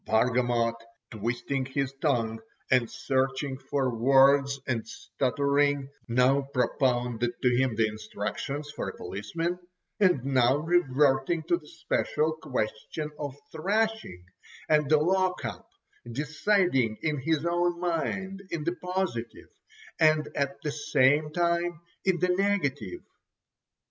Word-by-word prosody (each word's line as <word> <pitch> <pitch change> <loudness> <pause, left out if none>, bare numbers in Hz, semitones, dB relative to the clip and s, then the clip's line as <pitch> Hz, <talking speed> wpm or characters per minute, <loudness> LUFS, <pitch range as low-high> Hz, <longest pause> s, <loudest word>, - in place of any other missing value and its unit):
Bargamot, 120 0 +2 0.4
twisting 120 +5 -2
his 135 0 -2
tongue, 115 -7 +1 0.3
and 125 -3 +3
searching 135 0 -1
for 135 -4 -1
words 135 +3 +4
and 115 -4 -1
stuttering, 140 +4 0 0.2
now 125 +3 +3
propounded 125 -3 0
to 125 -1 +4
him 130 -2 +1
the 110 0 +3
instructions 110 +7 -5
for 100 - -4
a - - -10
policeman, 165 - -3 0.4
and 180 - +3
now 130 -1 +3
reverting 150 -1 +2
to 170 +2 +2
the 160 -3 -10
special 160 -1 -1
question 130 +6 -3
of 145 -2 -5
thrashing, 200 - -1 0.4
and 150 -2 +3
the 155 - +6
lock 185 +3 +1
up, - - -6 0.4
deciding 150 - +1
in 150 -3 0
his 160 +3 0
own 175 0 +1
mind 190 +3 -2
in 165 -3 -3
the 170 +3 0
positive, 180 -10 -3 0.5
and 155 -1 +4
at 140 -1 -1
the 150 - -1
same 145 0 +2
time 170 0 0 0.3
in 190 -2 +3
the 180 +1 +1
negative. 195 - 0
140 Hz, 120 wpm, -28 LUFS, 125-165 Hz, 0.5 s, the